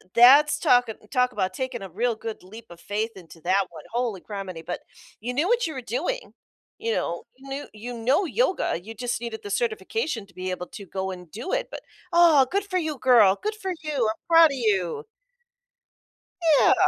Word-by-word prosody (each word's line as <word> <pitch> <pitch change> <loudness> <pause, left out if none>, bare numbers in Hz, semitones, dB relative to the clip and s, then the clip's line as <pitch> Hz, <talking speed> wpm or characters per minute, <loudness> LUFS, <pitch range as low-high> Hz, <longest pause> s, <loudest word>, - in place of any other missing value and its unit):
that's 285 +5 +7
talking 245 -3 +3 0.2
talk 250 -2 +2
about 190 -5 -1
taking 260 -3 -4
a 195 - -7
real 230 +6 0
good 220 -3 -7
leap 220 +5 -12
of 170 - -13
faith 210 +5 -2
into 170 -3 -14
that 190 +2 +2
one. 160 -3 -11
Holy 235 -6 -1
grammity. 190 -6 -7
But 180 - -4 0.4
you 245 +3 -3
knew 300 +7 +1
what 475 -4 +2
you 315 - -5
were 260 - -5
doing. 315 - -3 0.5
You 455 +1 -1
know? 170 - -2
You 270 +1 -13
knew 275 +2 -5
you 235 +3 -7
know 260 - +2
yoga. 375 - 0
You 220 +5 -9
just 245 +1 -3
needed 230 -2 -5
the 205 - -6
certification 225 +2 -1
to 185 - -22
be 185 0 -3
able 180 -1 -4
to 200 - -10
go 190 +1 -3
and 180 -2 -9
do 235 - -6
it, - - -1
but, - - -7 0.3
oh, 335 -6 +7
good 400 +2 0
for 375 -2 -1
you, 315 -4 -2
girl. 225 -7 +6
Good 425 +1 -2
for 385 -3 -4
you. 285 -7 0
I'm 220 - -6
proud 330 -1 +8
of 275 - -4
you. 195 -8 0 1.6
Yeah. - - +6
235 Hz, 205 wpm, -25 LUFS, 195-290 Hz, 1.6 s, proud